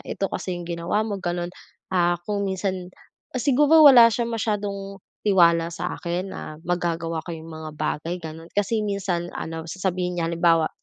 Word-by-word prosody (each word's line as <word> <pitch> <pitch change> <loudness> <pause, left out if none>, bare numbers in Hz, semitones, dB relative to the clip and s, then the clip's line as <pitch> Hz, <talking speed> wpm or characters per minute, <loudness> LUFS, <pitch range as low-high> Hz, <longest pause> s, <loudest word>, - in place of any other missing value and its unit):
ito 195 - -2
kasi 185 - -3
yung 175 -1 -7
ginawa 170 +4 -1
mo 205 -2 -2
ganon. 175 0 -2 0.4
Ah 175 -1 +2
kung 200 -1 0
minsan 185 -1 -3 0.5
siguro 295 +4 +5
wala 240 -4 +9
siyang 235 0 -1
masyadong 200 -2 -3 0.3
tiwala 170 -4 +5
sa - - -3
akin 175 +3 -3
na 155 -4 -7
magagawa 170 -2 -1
ko 170 - -4
yung 160 0 -10
mga 160 -1 -7
bagay 155 +3 -2
ganon. 160 +1 -8
Kasi 205 +2 +1
minsan, 190 -4 -2
ano 160 0 -5
sasabihin 180 0 -2
niya 165 - 0
halimbawa, 165 -1 +3
180 Hz, 160 wpm, -24 LUFS, 170-200 Hz, 0.5 s, wala